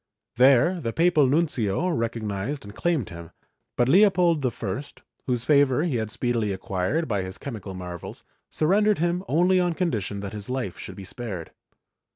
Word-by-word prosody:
There 140 +8 +5
the 115 -5 -3
papal 165 -4 +4
nuncio 145 - +1
recognized 115 - -3
and 100 - -10
claimed 160 - -1
him, 85 -1 -9 0.5
but 120 - +3
Leopold 180 -2 +4
I, 115 -3 -2 0.5
whose 125 -2 0
favor 145 -1 +3
he 155 -8 0
had 110 -1 -2
speedily 115 -2 -1
acquired 95 - -1
by 105 -5 0
his 95 0 -6
chemical 105 -8 -7
marvels, 90 -2 -8 0.3
surrendered 205 +6 +2
him 175 +3 0
only 180 +5 +3
on 175 -2 +1
condition 105 - -2
that 100 0 -6
his 105 0 -6
life 125 -8 -3
should 95 - -7
be 95 - -9
spared. 100 -6 -7
125 Hz, 160 wpm, -25 LUFS, 100-165 Hz, 0.5 s, There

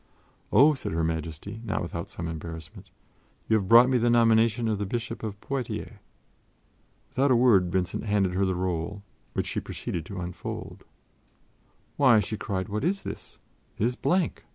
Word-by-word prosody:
"Oh," 150 +4 +6
said 135 - -5
Her 80 0 0
Majesty, 80 +6 -4
not 105 -5 -2
without 85 -1 -5
some 85 - -5
embarrassment, 80 -1 -8 0.6
"you 110 - +3
have 100 -3 0
brought 120 +3 +8
me 130 -1 +2
the 120 +1 +2
nomination 115 0 +4
of 105 -2 0
the 105 - -1
Bishop 115 +3 -4
of 105 -2 -5
Poitiers." 135 -4 -4 1.1
Without 135 +2 +1
a 130 - +5
word, 105 -8 +4
Vincent 90 +3 -1
handed 100 -3 +1
her 95 +2 +1
the 95 -1 +1
roll, 90 +2 -3 0.3
which - - -1
she - - -2
proceeded 85 - -5
to 100 -2 -6
unfold. 90 0 -6 1.1
"Why," 130 -6 +6
she 110 - -2
cried, 95 -3 -3
"what 105 +3 -3
is 195 +4 0
this? - - -8 0.4
It 105 - +1
is 125 +1 0
blank! 180 +5 0
105 Hz, 170 wpm, -27 LUFS, 90-120 Hz, 1.1 s, brought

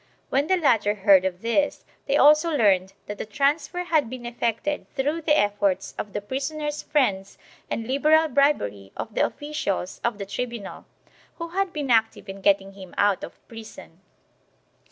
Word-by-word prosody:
When 275 +3 +1
the 375 - +3
latter 220 - +2
heard 195 -2 +5
of 185 +1 -3
this 260 +6 0 0.2
they 275 - +2
also 300 +4 +6
learned 195 - +2
that 205 0 -7
the - - -3
transfer 290 - 0
had 315 -8 +1
been 250 -1 -8
effected 240 +4 -2
through 295 +4 -1
the 305 -1 +3
efforts 205 -2 0
of 205 - -6
the 205 - -3
prisoner's 295 +6 -3
friends 200 -10 0 0.3
and 225 - -3
liberal 305 +5 +3
bribery 240 - +1
of 220 - -5
the - - +2
officials 245 -11 -3
of 235 -3 0
the 200 - -5
tribunal, 230 +1 -6 0.5
who 335 -1 -6
had 385 +2 -1
been 290 -5 -3
active 225 -2 +2
in 195 0 -8
getting 195 0 +2
him 190 -2 -12
out 200 -2 +2
of - - -11
prison. 220 -6 -12
235 Hz, 165 wpm, -24 LUFS, 200-295 Hz, 0.5 s, also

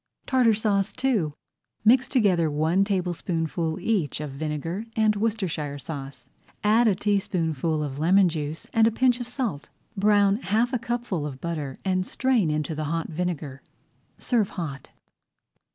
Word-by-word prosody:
TARTAR 250 -4 +3
SAUCE 205 -2 +1
II 195 - +1 0.5
Mix 255 +4 +5
together 185 - +2
one 160 +6 +2
tablespoonful 175 -4 -2
each 185 - 0
of 150 -2 -5
vinegar 155 +7 -3
and 215 -1 +3
Worcestershire 190 -10 -2
sauce, 140 -1 -7 0.4
add 225 +3 +4
a 205 - +3
teaspoonful 165 -6 0
of 140 -1 -5
lemon 185 +4 +5
juice 155 -1 -4
and 225 0 +5
a - - +2
pinch 245 +1 +2
of 245 - -5
salt. 245 - -3 0.3
Brown 205 0 +4
half 230 +3 0
a 250 - +1
cupful 235 -9 -2
of 135 -3 -8
butter 150 -5 -4
and 185 -1 +1
strain 255 -10 +1
into 150 0 -1
the 155 0 -3
hot 165 +2 -2
vinegar. 160 -5 -3 0.6
Serve 225 -6 +1
hot. 145 -7 -6
180 Hz, 145 wpm, -25 LUFS, 155-220 Hz, 0.6 s, Mix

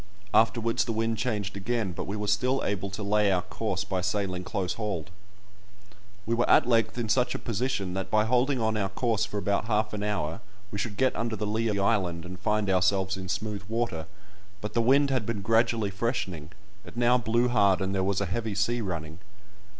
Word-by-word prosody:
Afterwards 115 +1 +3
the 115 - -2
wind 115 0 0
changed 105 -4 -2
again, 105 0 -1
but - - -5
we 100 - -3
were 105 - -2
still 125 +6 +1
able 100 -1 -2
to 100 +2 -5
lay 105 0 +3
our 90 -2 +1
course - - -3
by 95 -1 -2
sailing 95 -1 -1
close 90 -1 -2
hauled. 105 -7 -4 1.1
We 115 - 0
were 120 +1 +1
at - - +6
length 115 0 +2
in 120 -2 -1
such 125 +3 +2
a - - 0
position, 110 -5 -2
that 95 0 -3
by 105 +1 +3
holding 125 +3 +2
on 110 -1 +1
our 100 -2 0
course 110 +1 0
for 105 - -5
about 100 0 0
half 105 -1 0
an 105 - -3
hour 100 -6 -2 0.3
we 100 - -4
should 105 -3 -3
get 130 +2 +2
under 115 -1 -1
the 105 - -3
lee 110 +2 0
of 105 - 0
the 100 - 0
island 90 -6 +1
and 90 +1 -8
find 105 +1 0
ourselves 95 +1 +2
in 95 -1 -7
smooth 105 +1 -2
water, 115 -8 -2 0.5
but 105 - -5
the 115 - +2
wind 140 +4 +4
had 130 -4 +1
been 105 -1 -3
gradually 115 -1 +2
freshening; 95 - -2 0.3
it 120 - -12
now 120 +1 +4
blew 120 +2 +2
hard, 100 -6 +4
and 95 0 -1
there 95 -1 +1
was 95 0 +1
a 100 - 0
heavy 110 +2 -2
sea 120 +4 +1
running. 80 -5 -5
105 Hz, 210 wpm, -28 LUFS, 95-115 Hz, 1.1 s, at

